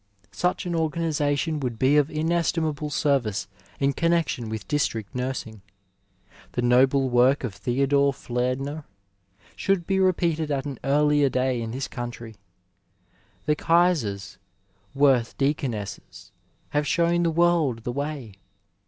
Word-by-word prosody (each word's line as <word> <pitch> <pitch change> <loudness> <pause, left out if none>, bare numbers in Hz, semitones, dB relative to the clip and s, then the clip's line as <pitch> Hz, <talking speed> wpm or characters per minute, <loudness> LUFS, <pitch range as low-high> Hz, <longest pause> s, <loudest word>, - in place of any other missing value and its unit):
Such 180 +1 -1
an 175 - -2
organization 160 -2 0
would 125 -4 -3
be 130 +5 +3
of 150 0 +3
inestimable 160 -1 -1
service 135 -9 0 0.3
in 140 0 +2
connexion 165 -9 0
with 110 0 -5
District 115 -9 -1
Nursing. 125 -4 -4 0.9
The 120 - -1
noble 130 +2 +4
work 125 +3 +3
of 120 -6 -3
Theodore 140 +6 +1
Fliedner 130 +4 -3 0.7
should 195 -4 0
be 195 +1 0
rq)eated 170 -4 +1
at 140 -1 -1
an 140 -4 -6
early 145 0 +3
day 130 -1 0
in 115 - -4
this 130 +4 -4
country. 120 -2 -7 1.1
The 150 - +2
Eaisers 150 - +1 0.6
werth 135 -4 +3
Deaconesses 135 -7 -3 0.4
have 150 0 0
shown 170 0 +2
the 170 - +2
world 165 -8 +2
the 120 - -3
way. 140 -4 -4
140 Hz, 125 wpm, -25 LUFS, 125-160 Hz, 1.1 s, noble